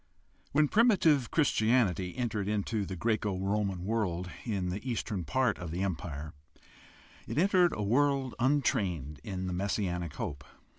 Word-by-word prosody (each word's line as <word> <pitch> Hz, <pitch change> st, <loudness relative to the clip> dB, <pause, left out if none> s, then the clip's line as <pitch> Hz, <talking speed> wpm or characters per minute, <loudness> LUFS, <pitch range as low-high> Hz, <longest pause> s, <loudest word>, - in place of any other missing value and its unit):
— -, -, -36 dB
When 150 Hz, +1 st, +4 dB
primitive 170 Hz, -, +4 dB
Chris 150 Hz, -4 st, +2 dB
tianity 110 Hz, -5 st, +1 dB
entered 110 Hz, -5 st, -1 dB
into 105 Hz, 0 st, -1 dB
the 95 Hz, -, -4 dB
Greco 105 Hz, 0 st, 0 dB
Roman 95 Hz, -1 st, -1 dB
world 90 Hz, -5 st, -1 dB
in 100 Hz, -6 st, -1 dB
the 100 Hz, +3 st, -4 dB
eastern 105 Hz, -6 st, -2 dB
part 130 Hz, +5 st, +1 dB
of 85 Hz, -2 st, -5 dB
the 90 Hz, +4 st, -2 dB
Empire, 80 Hz, -5 st, -4 dB, 0.9 s
it -, -, -4 dB
entered 180 Hz, 0 st, +4 dB
a 105 Hz, -, -2 dB
world 135 Hz, +3 st, +2 dB
untrained 95 Hz, -, 0 dB
in 95 Hz, -2 st, -4 dB
the 90 Hz, -, -2 dB
mes 95 Hz, +3 st, -1 dB
sianic 90 Hz, -6 st, -2 dB
hope. 70 Hz, -1 st, -5 dB
105 Hz, 155 wpm, -30 LUFS, 90-125 Hz, 0.9 s, When